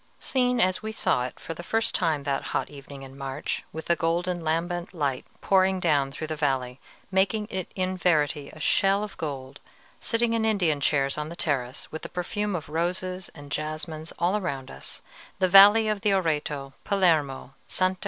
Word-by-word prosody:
Seen 250 -2 +1
as 185 -4 +2
we 220 0 -4
saw 125 - +1
it - - -13
for 165 - -6
the 165 - -8
first 225 +5 0
time 160 -5 +1
that 140 -1 0 0.2
hot 130 - -3
evening 140 -1 -10
in 135 0 -11
March, 135 -1 -4
with 160 - -7
the 170 - +3
golden 175 +1 -1
lambent 175 +3 -1
light 140 -5 -1
pouring 190 -1 +3
down 145 -6 +2
through 150 +3 -5
the 155 - -3
valley, 135 -4 -1 0.3
making 195 +3 +2
it 185 -2 -4
in 185 0 -1
verity 150 -5 +1
a 155 - -13
"shell 195 +6 +3
of 210 - -6
gold," 135 -4 -5 0.4
sitting 230 0 +1
in 225 -1 +1
Indian 180 -10 +2
chairs 140 0 +1
on 150 0 -3
the 170 - -7
terrace, 130 -7 -2
with 160 - -6
the - - -7
perfume 205 +3 -2
of 160 -2 -4
roses 180 +3 -2
and 145 -2 -11
jasmines 155 +1 -4
all 175 +4 +2
around 140 -10 -3
us, 65 - -9 0.3
the 185 -1 +3
valley 205 +4 +8
of 210 -2 0
the 210 - +2
Oreto, 150 -6 -1
Palermo, 160 -10 +1
Sta. 185 0 +1
165 Hz, 185 wpm, -26 LUFS, 145-190 Hz, 0.4 s, valley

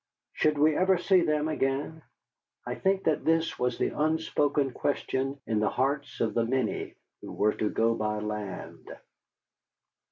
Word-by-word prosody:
Should 155 -1 +1
we 155 +1 +4
ever 185 +2 +3
see 185 +1 +3
them 150 -2 +1
again? 150 +1 -1 0.6
I 125 - -3
think 190 +7 0
that 155 -2 +1
this 165 0 +1
was 125 0 0
the - - +1
unspoken 150 -3 +1
question 135 +1 -2
in 110 -2 0
the 105 - +2
hearts 140 +2 -1
of 110 -2 +1
the 115 - +2
many 130 +3 -2 0.3
who - - -8
were 105 +1 +1
to 105 - -1
go 115 +1 +2
by 105 -1 -2
land. 105 -2 -6
140 Hz, 155 wpm, -28 LUFS, 115-155 Hz, 0.6 s, we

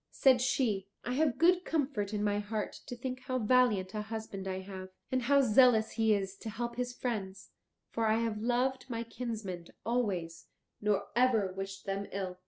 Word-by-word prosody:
Said 260 -2 +4
she, 250 -7 +1 0.2
"I 245 - -1
have 290 -1 +2
good 355 +2 +4
comfort 270 - -1
in 210 -1 -1
my 205 0 +1
heart 210 +1 -3
to 245 - -5
think 255 +1 -4
how 255 -1 0
valiant 215 -5 +3
a 215 - -2
husband 215 -3 -6
I 190 0 -3
have, 190 -1 -8 0.2
and 260 0 +1
how 280 +3 +4
zealous 235 -2 +5
he 225 -1 +2
is 195 -1 -3
to 220 - -6
help 235 +2 -4
his 245 0 -2
friends, 195 -6 -4 0.4
for 225 -1 0
I 220 +1 +3
have 225 -2 -1
loved 255 +3 0
my 230 -1 -2
kinsmen 220 -7 -5 0.2
always, 190 -9 -1 0.3
nor 210 -1 +1
ever 235 -6 +3
wished 195 0 -6
them 195 0 -2
ill." 185 -2 -4
220 Hz, 185 wpm, -32 LUFS, 195-250 Hz, 0.4 s, zealous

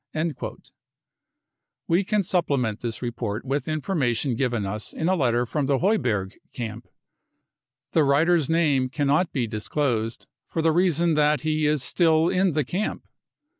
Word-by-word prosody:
55 155 -2 -3 1.3
We 170 +4 +3
can 210 +1 +1
supplement 140 - 0
this 120 0 -5
report 115 -2 -3
with 140 +4 -2
information 145 - 0
given 120 -4 -1
us 105 +2 -4
in 160 - -2
a 185 - +3
letter 120 -6 +1
from 140 +3 -2
the 140 -1 +2
Heuberg 110 - 0 0.2
camp. 115 -1 -6 1.0
The 160 - +3
writer's 155 +3 +3
name 145 -6 +2
can 145 +2 -2
not 150 +6 +2
be 125 -3 -1
disclosed, 115 +1 -2 0.2
for 165 - -2
the 160 - +4
reason 170 -1 +2
that 150 0 +2
he 155 -1 0
is 150 -3 +1
still 160 +1 +3
in 185 -2 +2
the 150 -2 0
camp. 190 +11 -3
145 Hz, 150 wpm, -24 LUFS, 120-165 Hz, 1.3 s, the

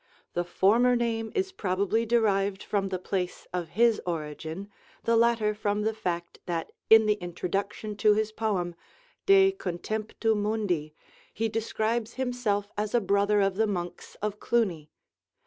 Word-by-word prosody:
The 175 - 0
former 225 +8 +3
name 225 -2 -1
is 385 0 0
probably 200 - 0
derived 200 -4 +2
from 195 -2 -1
the 185 - -1
place 180 0 -3
of 175 -3 -2
his 230 -2 +4
origin, 160 +2 -4 0.4
the 230 - +2
latter 230 -2 +3
from 210 0 -1
the 220 +1 +1
fact 175 -5 -4
that 165 -2 -2 0.2
in 220 0 +8
the 210 0 +2
introduction 195 +4 -3
to 210 0 +4
his 215 0 0
poem 200 -6 -1 0.5
'De 390 0 +7
Contemptu 215 - -2
Mundi' 205 -8 -1 0.4
he 225 +2 -1
describes 225 +1 -1
himself 245 -6 -1
as 210 +2 -1
a - - +6
brother 200 0 +2
of 195 -1 +1
the 220 0 +3
monks 175 -4 -5
of 210 0 -2
Cluny. 185 -11 0
210 Hz, 145 wpm, -28 LUFS, 185-225 Hz, 0.5 s, in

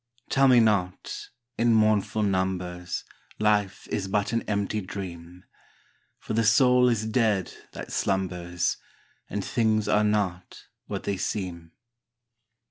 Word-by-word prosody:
Tell 135 0 +4
me 125 -2 +7
not, 100 -5 0 0.3
in 115 0 +4
mournful 110 0 +2
numbers, 90 -2 -2 0.3
Life 105 -2 +1
is 95 - -2
but 100 +3 0
an 115 - +1
empty 100 +1 -1
dream! 90 -2 -8 0.7
For - - -6
the 115 +1 +2
soul 125 +3 +5
is 110 -2 0
dead 110 -4 +1 0.2
that - - -8
slumbers. 90 -2 -1 0.5
And - - -3
things 110 -2 +1
are 105 0 +3
not 100 -4 -1 0.2
what - - -4
they 100 - -2
seem. 85 -4 -4
100 Hz, 125 wpm, -26 LUFS, 90-110 Hz, 0.7 s, me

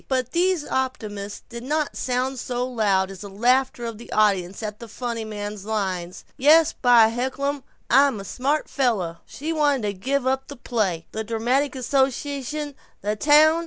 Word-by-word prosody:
But 255 -2 -1
these 355 -1 +2
optimisms 210 -6 -3
did 235 -1 -8
not 300 +4 -1
sound 255 +1 -1
so 245 0 -2
loud 200 -6 +1
as 190 -1 -10
the 200 - -7
laughter 245 +4 +1
of 230 -2 -5
the 235 - -12
audience 200 -2 +1
at 210 -1 -5
the 235 - -9
funny 235 0 -4
man's 205 -2 -6
line, 190 -5 -2 0.3
"Yes, 310 +4 +6
by 240 -3 +5
heckelum, 265 +4 -2 0.3
I'm 270 -3 +4
a 195 - -7
smart 280 +8 -1
fella." 210 - 0
She 315 +4 -4
wanted 290 -5 +2
to 205 -1 -1
give 255 +7 -1
up 265 +1 0
the 285 - -8
play, 205 -10 -1
the 220 - -3
dramatic 245 +6 0
association, 275 +3 -1 0.3
the 210 +1 -1
town. 305 +7 +5
245 Hz, 165 wpm, -24 LUFS, 210-275 Hz, 0.3 s, Yes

